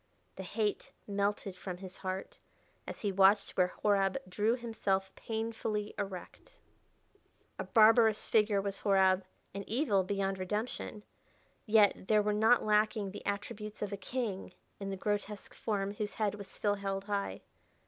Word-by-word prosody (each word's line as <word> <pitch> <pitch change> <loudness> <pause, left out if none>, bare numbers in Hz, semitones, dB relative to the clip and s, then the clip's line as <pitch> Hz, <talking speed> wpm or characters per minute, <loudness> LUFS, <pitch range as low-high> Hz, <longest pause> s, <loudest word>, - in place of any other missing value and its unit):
The - - -6
hate 205 +3 -2
melted 200 -1 -1
from 180 -1 -6
his 185 0 -9
heart 190 0 -5 0.5
as - - -7
he 205 - 0
watched 195 +2 +4
where 180 -1 +4 0.2
Horab 200 +2 +3
drew 210 +5 +1
himself 200 -5 -1
painfully 220 -2 -3
erect. 195 - -7 1.0
A - - -2
barbarous 220 -1 +5
figure 210 -2 +3
was 195 0 -3
Horab, 190 -2 +4 0.3
and 200 0 -4
evil 220 -6 +2
beyond 195 0 -1
redemption, 210 +2 -3 0.6
yet 210 -3 +4
there 215 -1 +4
were 210 0 +1
not 220 +3 +4
lacking 210 -1 +2
the - - -8
attributes 205 +1 -4
of 205 -1 -3
a - - 0
king 210 -2 -4 0.3
in 195 -1 -4
the 195 - -3
grotesque 205 0 -3
form 200 -2 -2
whose 205 0 -4
head 210 -2 0
was 205 -2 -8
still 205 -1 0
held 195 -1 -3
high. 200 -1 -2
205 Hz, 150 wpm, -32 LUFS, 195-215 Hz, 1.0 s, barbarous